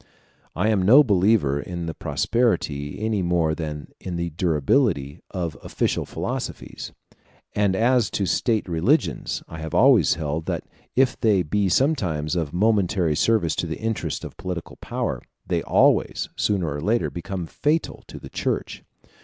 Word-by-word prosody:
I 100 +5 +1
am 105 -4 +2
no 125 +11 +7
believer 95 - +3
in 85 +4 -5
the 80 - -4
prosperity, 80 - -1
any 110 -3 0
more 85 -3 +1
than 75 -2 -5
in 90 -2 -5
the 85 0 -2
durability, 80 - +1
of 85 -4 -3
official - - -1
philosophies; - - -5 0.6
and 100 -2 +2
as 120 +2 +3
to 100 - 0
state 110 +5 0
religions, 85 - 0
I 80 - -8
have 80 -1 -5
always 120 - +5
held, 80 0 -3
that - - -2 0.3
if 130 0 +2
they 105 -6 +3
be 100 +5 0
sometimes 90 - +1
of 80 -4 -1
momentary 95 -4 +2
service 95 -5 +2
to 85 - -1
the 80 - -4
interests 110 -8 -3
of - - -9
political 90 -2 -6
power, - - -3 0.2
they - - 0
always, - - +2
sooner 90 -8 0
or 75 - -4
later, 110 +7 +1
become 90 +1 -5
fatal 150 - -1
to - - -9
the - - -10
Church. - - -3
90 Hz, 155 wpm, -23 LUFS, 80-110 Hz, 0.6 s, no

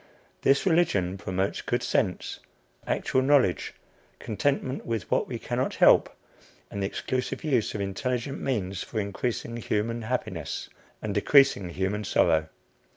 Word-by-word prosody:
This 140 +6 +3
religion 130 - +2
promotes 95 0 -2
good - - -1
sense, - - -1 0.5
actual 130 - +1
knowledge, 130 -9 +2 0.4
contentment 130 +4 -1
with 115 -4 -3
what - - +2
we - - -4
cannot - - -2
help, - - +6 0.6
and 100 - -4
the 95 - +1
exclusive 130 +5 -3
use 130 -10 +1
of 105 - -2
intelligent 125 +7 -2
means 100 -8 -2
for 110 - -4
increasing 115 +3 -3
human 115 +1 -1
happiness 110 - -3 0.3
and - - -2
decreasing 135 -10 +4
human 95 +4 -2
sorrow. 80 -4 +2
115 Hz, 130 wpm, -27 LUFS, 95-130 Hz, 0.6 s, help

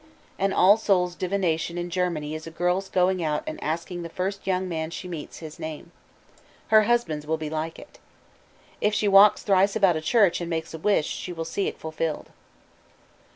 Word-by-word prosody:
An 195 0 +1
All 195 +3 +6
Souls' 180 -5 +1
divination 175 -3 -1
in 175 0 -4
Germany 170 -4 -1
is 155 +1 -6
a - - -5
girl's 180 +3 -1
going 185 -1 +1
out 150 -1 -1
and 155 - -6
asking 170 +3 -3
the 170 - -6
first 195 +3 -4
young 185 0 0
man 160 -2 -3
she 180 +2 -7
meets 165 -4 -7
his 155 0 -10
name. 155 -1 -7 0.8
Her 215 -1 +6
husband's 170 -11 0
will 160 +1 0
be 155 -1 -5
like 160 +1 -3
it. - - -14 0.8
If 210 0 +2
she 210 - +1
walks 200 +1 +6
thrice 195 0 +3
about 195 -5 +4
a 155 - -2
church 190 -1 +3
and 170 - -4
makes 165 -1 -3
a 160 - -6
wish, 200 -3 +2
she 180 - -5
will 165 -2 -5
see 195 +4 -2
it - - -5
fulfilled. 160 0 -4
175 Hz, 195 wpm, -25 LUFS, 160-195 Hz, 0.8 s, All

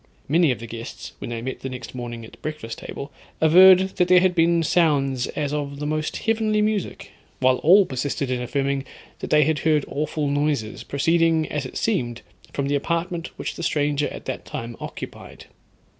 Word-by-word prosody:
Many 165 +2 +4
of 125 - +1
the 115 - -8
guests, 115 0 -8
when - - -6
they 115 -1 -4
met 130 +1 -4
the 135 - -5
next 125 -2 -8
morning 120 -2 -6
at - - -13
the - - -16
breakfast 155 -7 -6
table, 140 +1 -7 0.3
averred 180 +4 +8 0.2
that 180 - +3
there 180 0 +7
had 185 0 +3
been 170 0 +3
sounds 140 -6 +2
as 145 -1 -3
of 140 -1 -3
the 145 - -4
most 155 +1 -2
heavenly 220 -1 +1
music, 210 -2 -2 0.3
while 130 0 +4
all 190 +8 +6
persisted 135 -1 -2
in 125 -1 -1
affirming 135 +2 -1 0.4
that - - -5
they 150 0 +5
had 155 +1 +1
heard 155 -2 +2
awful 150 +1 -2
noises, 145 -6 -1
proceeding, 165 +2 +2
as 145 -3 -3
it - - -8
seemed, 120 - -1 0.3
from 140 -1 -2
the 140 - 0
apartment 170 +3 -1
which - - -4
the - - -8
stranger 145 -2 0
at - - -9
that - - -4
time 115 0 -6
occupied. - - -9
145 Hz, 190 wpm, -23 LUFS, 130-165 Hz, 0.4 s, averred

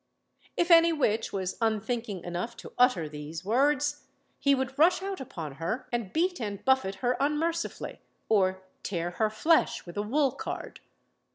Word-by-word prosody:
If 345 0 +2
any 335 0 +8
witch 230 -8 0
was 190 -2 -3
unthinking 220 -3 -1
enough 180 +7 -4
to - - -10
utter 245 -11 +3
these 150 +3 -7
words, 290 +5 +1 0.3
he 280 -1 +4
would 265 +1 -3
rush 355 +4 +5
out 390 -5 -4
upon 155 - -7
her 220 +10 -2
and 235 -6 -2
beat 355 -1 0
and 205 -3 -5
buffet 265 -8 +2
her 250 +1 +3
unmercifully, 320 +4 -1 0.3
or 190 -3 +2 0.2
tear 175 -2 -2
her 215 +4 +1
flesh 310 +10 +2
with 175 +2 -10
a - - +1
wool 270 +6 +2
card. - - -6
235 Hz, 160 wpm, -28 LUFS, 190-295 Hz, 0.3 s, any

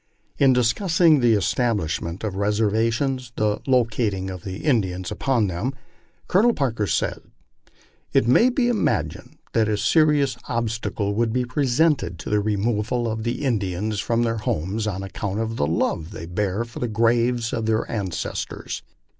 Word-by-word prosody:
In 135 -2 +6
discussing 155 - +3
the 120 -2 +4
establishment 95 - -1
of 105 -3 -2
reservations, 115 +5 0
and 110 - +1
the 105 0 0
locating 110 -7 +1
of 90 -1 -8
the 95 +3 -6
In 130 -7 +4
dians 90 -1 -5
upon 125 -5 +1
them, 100 +9 -3 0.5
Colonel 225 +6 +4
Parker 115 -7 -1
says: 80 - 0 0.5
" - - -34
It 110 - +3
may 230 - +5
be 250 -1 +1
imagined 240 -3 -1 0.2
that 110 -2 +2
a 105 - +1
seri 150 +4 +4
ous 135 - -2
obstacle 115 -3 -2
would 115 +1 +1
be 125 +2 0
presented 130 - +1
to 85 - -7
the 105 - +3
removal 110 +3 0
of 110 0 -2
the 120 +5 -3
Indians 105 -3 -1
from 115 +4 +1
their 115 -1 0
homes 105 +2 -2
on 95 -2 -3
account 100 +1 -4
of 115 0 -2
the 70 - +1
love 80 0 -1
they 105 -4 -8
bear 100 +5 -1
for 115 - -10
the 120 - -1
graves 115 +1 +1
of 110 -1 -2
their 110 0 +1
ancestors. 95 -7 -4
115 Hz, 165 wpm, -23 LUFS, 100-125 Hz, 0.5 s, In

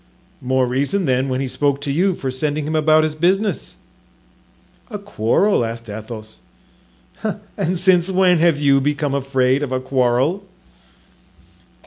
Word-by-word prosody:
"More 130 0 +1
reason, 140 +10 -1
then, 130 0 0
when 130 +1 -1
he 135 - -2
spoke 140 +2 0
to 145 -1 -3
you, 180 +5 +1
for 135 -5 -4
sending 145 +3 -2
him 155 +1 -2
about 155 0 +4
his 155 -1 -1
business." 190 +7 0 1.1
"A 210 - -5
quarrel?" 200 - +1
asked 115 0 -6
Athos. 110 0 -9 1.2
"And 185 -2 -1
since 180 0 +3
when 185 -2 +3
have 165 -3 +3
you 140 -2 +3
become 145 0 -1
afraid 135 -1 +1
of 145 -3 -3
a 130 - 0
quarrel?" 130 +8 0
145 Hz, 140 wpm, -19 LUFS, 130-170 Hz, 1.2 s, about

